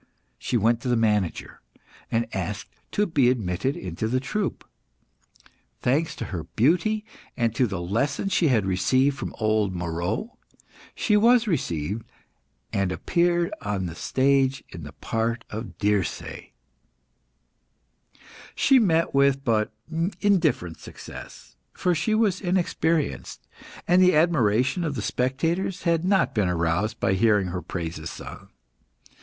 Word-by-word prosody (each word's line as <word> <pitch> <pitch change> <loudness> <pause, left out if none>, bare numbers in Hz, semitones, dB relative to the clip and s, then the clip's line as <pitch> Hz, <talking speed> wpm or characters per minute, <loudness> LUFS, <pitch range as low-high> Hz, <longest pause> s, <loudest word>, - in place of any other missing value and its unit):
She 125 - 0
went 115 +2 +2
to - - -5
the 125 - +2
manager, 105 -6 0 0.5
and 115 +1 +1
asked 100 +2 -4 0.2
to 210 - +2
be 145 -9 +3
admitted 110 +1 -1
into 90 +4 -4
the 130 +3 +1
troupe. 200 +9 -3 1.2
Thanks 150 +5 +1
to - - -5
her 80 -3 -4
beauty, 180 - +1 0.3
and 115 -2 +1
to 125 +1 +2
the 95 -4 -4
lessons 140 - -1
she 170 - +3
had 115 -7 +2
received 130 +9 +2
from - - -6
old 110 -4 +1
Moeroe, 90 - -3 0.6
she 210 - +2
was 235 +3 +5
received, 105 - -1 0.7
and 100 -3 0
appeared 175 - +1
on 100 -2 -2
the 85 - -5
stage 135 +7 +1
in 85 - -9
the 75 - -10
part 115 +4 -2
of 110 +2 -6
Dirce. 105 -3 -1 2.1
She 270 -1 +5
met 165 -7 +2
with 140 0 +3
but 110 -5 +1 0.5
indifferent 165 - +1
success, - - -11 0.2
for 180 - +1
she 215 +6 0
was 210 -5 +2
inexperienced, 170 -4 -1 0.4
and 180 +2 +5
the 185 -2 +5
admiration 140 - +2
of 150 -4 -2
the 110 - -3
spectators 160 - -1
had 170 -2 +2
not 190 0 +2
been 105 -5 +1
aroused 90 +6 0
by - - +2
hearing 105 -2 +3
her 90 0 -4
praises 80 -3 -5
sung. - - -10
125 Hz, 135 wpm, -25 LUFS, 100-165 Hz, 2.1 s, was